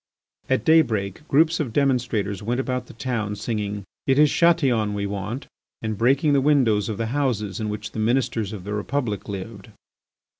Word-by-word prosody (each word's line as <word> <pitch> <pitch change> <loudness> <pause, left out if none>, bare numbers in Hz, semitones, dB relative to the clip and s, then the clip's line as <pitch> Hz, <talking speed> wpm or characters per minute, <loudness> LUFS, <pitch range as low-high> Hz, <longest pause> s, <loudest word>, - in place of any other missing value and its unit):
At 130 - +1
daybreak 125 - +2
groups 160 +3 +3
of 130 -8 -2
demonstrators 120 -8 0
went 120 +4 -1
about 125 -2 -2
the - - -12
town 110 -3 -2
singing, 105 -2 -3 0.2
"It 135 0 +3
is 150 -1 +5
Chatillon 130 -11 +3
we 100 0 -2
want," 100 +6 -4 0.3
and 110 -1 -3
breaking 135 +7 +3
the 140 - +4
windows 125 -8 +3
of 105 - -3
the 115 - -1
houses 120 -9 -1
in 110 -1 -2
which 105 0 -5
the - - -5
Ministers 115 -2 0
of 105 -4 -7
the 105 +2 -5
Republic 110 0 -2
lived. 100 +1 -7
115 Hz, 175 wpm, -23 LUFS, 105-135 Hz, 0.3 s, is